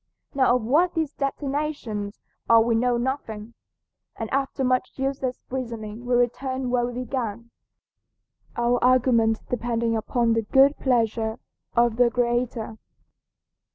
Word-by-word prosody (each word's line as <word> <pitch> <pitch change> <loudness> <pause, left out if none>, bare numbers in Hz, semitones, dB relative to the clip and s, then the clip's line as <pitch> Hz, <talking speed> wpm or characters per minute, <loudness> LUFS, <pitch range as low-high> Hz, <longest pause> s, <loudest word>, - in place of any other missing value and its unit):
Now 260 -3 +3
of 250 - -1
what 325 +10 +2
these 315 -3 -1
destinations 275 -7 -3 0.3
are 230 0 +8
we 235 0 +1
know 240 +1 +2
nothing, 235 -4 -4 0.6
and 225 -1 -5
after 275 0 -1
much 255 0 +1
useless 270 -1 -2
reasoning 230 -2 -5
we 245 - +2
return 255 +1 0
where 240 -1 +1
we 245 +1 -4
began, 235 -3 -4 1.0
our 240 +1 +1
argument 245 -3 +3
depending 235 -1 -1
upon 230 +1 +1
the 225 - +1
good 270 +6 +4
pleasure 225 -3 0 0.4
of 235 -1 +3
the 245 -1 +5
Creator. 240 -2 -1
245 Hz, 125 wpm, -24 LUFS, 230-260 Hz, 1.0 s, are